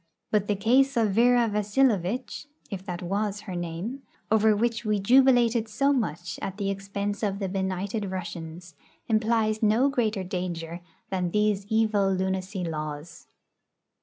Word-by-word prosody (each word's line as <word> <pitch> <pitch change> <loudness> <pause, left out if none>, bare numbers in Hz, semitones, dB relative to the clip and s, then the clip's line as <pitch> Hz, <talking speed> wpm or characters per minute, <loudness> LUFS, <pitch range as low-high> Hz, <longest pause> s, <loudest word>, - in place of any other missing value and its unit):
But 210 -2 +1
the 205 - +1
case 255 +6 +3
of 220 -3 +3
Vera 240 +3 +4
Vasilovitch 210 - 0 0.2
(if 190 -2 -5
that 180 -1 -4
was 200 +2 -2
her 190 -4 -7
name), 175 +10 -4 0.3
over 220 0 +4
which 230 +2 0
we 210 -2 +1
jubilated 240 0 +4
so 275 +6 +2
much 175 - -3
at 195 0 -4
the 200 -2 -1
expense 200 +1 -4
of 200 -3 -1
the 195 -1 -2
benighted 190 +2 -2
Russians, 175 -2 -7 0.3
implies 220 -1 +1
no 225 +6 +4
greater 220 -7 0
danger 175 -2 -4 0.3
than 180 -2 0
these 210 0 +1
evil 215 -3 +2
lunacy 190 0 -2
laws. 155 -1 -6
205 Hz, 140 wpm, -26 LUFS, 185-225 Hz, 0.3 s, Vera